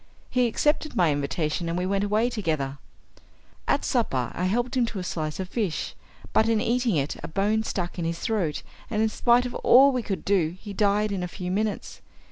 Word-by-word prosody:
He 250 -1 +3
accepted 300 +5 0
my 175 -4 +3
invitation, 150 +3 -1
and 170 - -1
we 180 - -1
went 195 +1 0
away 215 +4 +1
together. 155 - -2 0.9
At - - +1
supper - - 0
I 180 - -2
helped 240 +7 0
him 245 -2 +2
to 225 - -6
a 185 - -3
slice 155 -2 -3
of 190 - -3
fish, 195 -5 -2 0.4
but 220 - +4
in 225 -1 +3
eating 240 -2 +1
it 140 -1 -1
a - - -5
bone 205 +6 +1
stuck 180 -5 -3
in 170 - -1
his 165 0 -2
throat, 180 -7 -1 0.3
and 215 -1 +1
in 220 - +2
spite 240 +2 +3
of 245 - -4
all 270 +3 +6
we 255 -2 -1
could 200 -4 -4
do 180 -4 +1
he 205 0 -8
died 205 +1 +2
in 195 -2 -2
a 180 - -2
few 180 0 -5
minutes. 210 +2 -2
200 Hz, 210 wpm, -26 LUFS, 175-225 Hz, 0.9 s, all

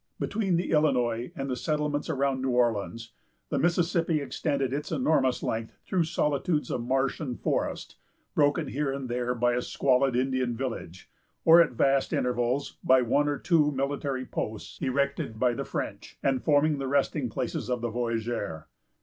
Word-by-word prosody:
Between 200 -4 0
the 175 - -1
Illinois 125 -6 +1
and 135 0 -4
the 130 - -1
settlements 150 +1 -1
around 135 -3 0
New 130 - 0
Orleans, 115 -2 0 0.4
the - - 0
Mississippi 170 -1 +2
extended 140 -1 -1
its 150 +1 -3
enormous 135 -3 +1
length 110 0 -3
through 180 -3 +1
solitudes 150 0 0
of 120 - -1
marsh 135 +2 0
and 130 -6 -4
forest, - - -2 0.4
broken 145 0 +2
here 140 +1 -1
and 135 -1 -4
there 125 +1 -1
by 120 0 +2
a 125 - 0
squalid 130 0 +2
Indian 130 -2 0
village; 115 -9 -5 0.4
or, 165 +1 +9
at 165 - +2
vast 135 +3 +2
intervals, 125 +2 0
by 130 -1 +5
one 145 +5 +2
or 145 -1 0
two 155 -4 +3
military 135 -1 -2
posts, 110 -3 -5
erected 140 -4 -1
by 125 0 +3
the - - -4
French, - - -5
and 135 -2 +1
forming 150 0 +3
the 135 - -2
resting 140 -1 +1
places 110 - -3
of 125 -2 -1
the 120 - -1
voyager. 115 -8 -2
135 Hz, 165 wpm, -28 LUFS, 120-150 Hz, 0.4 s, or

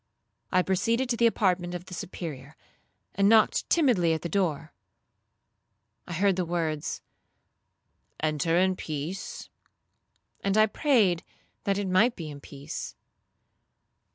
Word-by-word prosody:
I 185 - +3
proceeded 230 +7 0
to 240 - +1
the 235 0 +4
apartment 180 -5 0
of 175 0 -7
the 185 - -11
Superior, 155 -5 -7 0.6
and 200 +1 +3
knocked 220 -1 +4
timidly 230 - +3
at 160 - -3
the 170 - -3
door. 160 -5 -1 1.3
I 175 - -5
heard 190 +2 +2
the 185 - +1
words, 165 -3 -2 1.2
'Enter 155 +2 +1
in 185 +1 +3
peace;' 160 +4 -6 0.9
and 195 +1 +1
I 215 - +7
prayed 215 - +2 0.4
that 195 -1 +1
it 200 -1 -2
might 200 +7 +3
be 160 -4 -6
in 145 - -9
peace. 140 0 -7
180 Hz, 125 wpm, -27 LUFS, 165-200 Hz, 1.3 s, I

